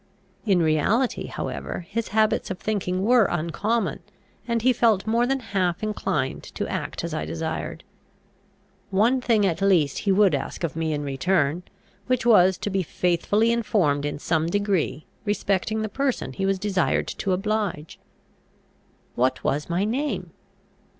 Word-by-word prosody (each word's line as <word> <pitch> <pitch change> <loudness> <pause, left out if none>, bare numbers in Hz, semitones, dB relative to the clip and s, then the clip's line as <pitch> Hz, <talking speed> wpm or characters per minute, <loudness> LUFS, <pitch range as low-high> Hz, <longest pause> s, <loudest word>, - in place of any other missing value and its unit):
In 185 -4 +4
reality 180 - +1
however 175 - -5
his 225 +3 -3
habits 215 0 +1
of 190 - -3
thinking 190 -3 -2
were 235 0 +5
uncommon, 195 +8 -1 0.5
and 235 -2 0
he 255 0 +5
felt 220 -5 +2
more 230 +2 +2
than 270 +1 0
half 180 -1 0
inclined 150 -10 -1
to - - -2
act - - -4
as 170 -2 -4
I 155 - -2
desired. 160 -1 -4 1.1
One 225 +6 +2
thing 225 -4 +3
at 175 -1 0
least 175 -8 +3
he 200 - +1
would 195 -2 +4
ask 140 +5 -3
of 165 - -2
me 160 -1 -1
in 145 -1 -2
return, 145 +3 0 0.5
which 255 -1 0
was 190 -5 +5
to 205 - -4
be 195 0 +1
faithfully 180 +6 +1
informed 190 -11 +1
in 145 0 -2
some 160 +2 0
degree 195 -5 0 0.2
respecting 205 +1 0
the - - -1
person 270 +4 -2
he 195 0 -1
was 195 0 +1
desired 190 -3 0
to 195 - -3
oblige. 195 -4 -2 1.1
What 130 +2 0
was 145 +4 -1
my 175 +3 +1
name? 275 +7 -2
195 Hz, 150 wpm, -24 LUFS, 165-220 Hz, 1.1 s, were